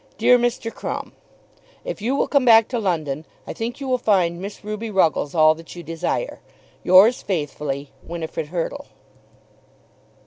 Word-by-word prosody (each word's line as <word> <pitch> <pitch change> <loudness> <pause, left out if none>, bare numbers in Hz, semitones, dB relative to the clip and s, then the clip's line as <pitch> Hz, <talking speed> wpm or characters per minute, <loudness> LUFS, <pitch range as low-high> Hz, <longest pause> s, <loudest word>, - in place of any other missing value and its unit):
DEAR 245 +3 +5
MR. 235 -1 -1
CRUMB, - - -5 0.7
If - - -5
you 245 +6 0
will - - +1
come 280 -2 +2
back 225 -2 +6
to 245 - -1
London 160 -8 -2 0.2
I - - -6
think 235 +3 -5
you 275 - -5
will 255 -1 +1
find 180 -6 +1
Miss 200 +2 -8
Ruby 215 +2 -5
Ruggles 165 -6 +1
all 155 -1 +6
that 165 +2 -12
you 175 - -8
desire. 165 - -3 0.4
Yours 195 +7 +6
faithfully, 145 -5 -3
WINIFRID 160 -2 -5
HURTLE. 180 - -4
190 Hz, 150 wpm, -22 LUFS, 165-235 Hz, 0.7 s, back